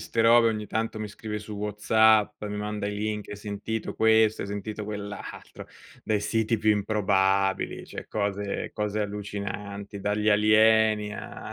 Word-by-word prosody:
'ste 115 - -2
robe, 115 0 +6
ogni 105 -1 -3
tanto 110 0 -2
mi 110 - -3
scrive 105 +1 -6
su 105 +1 -9
WhatsApp, 105 +1 +3
mi 105 0 -4
manda 105 0 -3
i 105 - -4
link, 105 0 -3
hai 105 - -6
sentito 105 +2 -4
questo, 110 -1 +3
hai 100 - -6
sentito 105 +1 -5
quell' 105 -1 -5
altro, - - -9 0.4
dai 105 -2 +1
siti 115 +1 0
più 110 +1 +3
improbabili, 100 -2 +1
cioè - - -8
cose 100 -1 -2
cose 105 0 -2
allucinanti, 100 0 -5
dagli 105 +2 0
alieni 110 0 +4
a - - -8
105 Hz, 155 wpm, -26 LUFS, 100-110 Hz, 0.4 s, robe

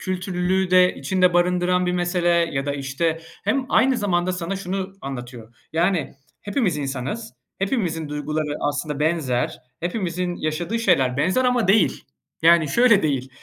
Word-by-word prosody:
kültürlülüğü 185 0 -1
de 185 0 +5
içinde 180 +5 +1
barındıran 180 +1 +2
bir 180 - 0
mesele 175 0 0
ya 165 -5 +1
da, 140 - 0
işte 140 +4 -1 0.3
Hem 255 +5 0
aynı 260 -1 +3
zamanda 185 -4 0
sana 180 +2 -3
şunu 190 0 -4
anlatıyor: 120 -3 -8 0.2
Yani, 170 -1 0 0.3
hepimiz 205 - 0
insanız, 140 - -4 0.2
hepimizin 180 - -1
duyguları 150 0 -3
aslında 145 0 -2
benzer, 150 -6 0 0.2
hepimizin 175 -1 -2
yaşadığı 165 +8 -2
şeyler 135 - +2
benzer 185 - +1
ama 245 -5 +2
değil. 195 -2 +3 0.4
Yani, 165 -2 +5
şöyle 235 - +4
değil, 135 -4 -1
175 Hz, 140 wpm, -22 LUFS, 150-190 Hz, 0.4 s, de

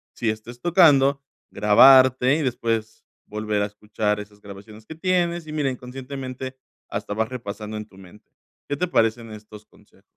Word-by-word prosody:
sí 115 - -1
estés 115 +3 -6
tocando, 145 -6 +4 0.3
grabarte 130 +5 +6
y - - -2
después 115 -3 -2 0.2
volver 105 -1 -2
a - - +1
escuchar 105 0 -3
esas 105 0 -14
grabaciones 105 +2 -12
que 160 - -10
tienes 175 -1 0
y - - -7
mira, 145 -3 0
inconscientemente 130 +1 -7 0.3
hasta - - -4
vas 110 +1 -1
repasando 110 -3 -7
en 105 - -6
tu 95 - -20
mente. 95 +2 -17 0.4
¿Qué 145 - -2
te 180 - -1
parecen 115 -4 0
estos 105 0 -12
consejos? - - -25
115 Hz, 160 wpm, -23 LUFS, 105-135 Hz, 0.4 s, grabarte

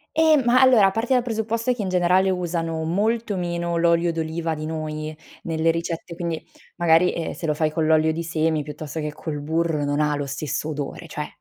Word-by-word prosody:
Ehm, 315 -3 +5
ma 245 +2 +5
allora, 235 -7 +6
parti 230 +5 0
dal 250 -1 +3
presupposto 230 +1 -1
che 240 - -5
in 195 - -2
generale 185 +1 +3
usano 165 -3 -2
molto 210 +6 0
meno 170 -1 -2
l'olio 170 0 +3
d'oliva 165 0 -2
di 155 0 -5
noi 155 -1 -4 0.3
nelle 165 0 +1
ricette, 165 +1 -4
quindi 170 -1 -3 0.4
magari, 170 +1 +4
ehm, 165 - -3
se 165 - -5
lo 150 - +1
fai 155 0 +1
con 155 0 0
l'olio 160 0 +4
di 165 +1 -3
semi 160 -1 0
piuttosto 150 +1 -6
che 150 -1 -3
col 150 -1 -5
burro 160 0 0
non 145 +1 +1
lo 145 -1 -3
stesso 145 +2 -3
odore, 150 +3 -5
cioè 150 -1 -5
165 Hz, 195 wpm, -23 LUFS, 155-185 Hz, 0.4 s, allora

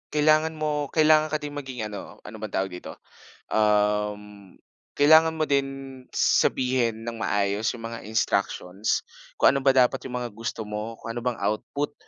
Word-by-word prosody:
kailangan 155 +1 +4
mo 150 -2 -1
kailangan 155 -1 +4
ka 155 - 0
ding 145 -1 -7
maging 130 -5 -5
ano, 105 -1 -9
ano 110 - -10
bang 110 -2 -6
tawag 95 0 -1
dito? 90 - -9 0.5
Um, 105 -2 0 0.4
kailangan 160 +2 +6
mo 155 - +1
din, 140 -1 +1 0.5
sabihin 120 -3 +1
ng 115 -2 -5
maayos 100 +2 0
yong 115 -2 -6
mga 115 0 -6
instructions, 100 -2 -1 0.3
kung - - +5
ano 135 - -1
ba 135 - +4
dapat 130 0 +3
yong 125 -1 -5
mga 120 -1 -4
gusto 115 0 -5
mo, 105 +2 -5
kung 115 +1 -7
ano 120 - -4
bang 125 -1 -2
output, 110 +8 -2
115 Hz, 165 wpm, -25 LUFS, 105-145 Hz, 0.5 s, kailangan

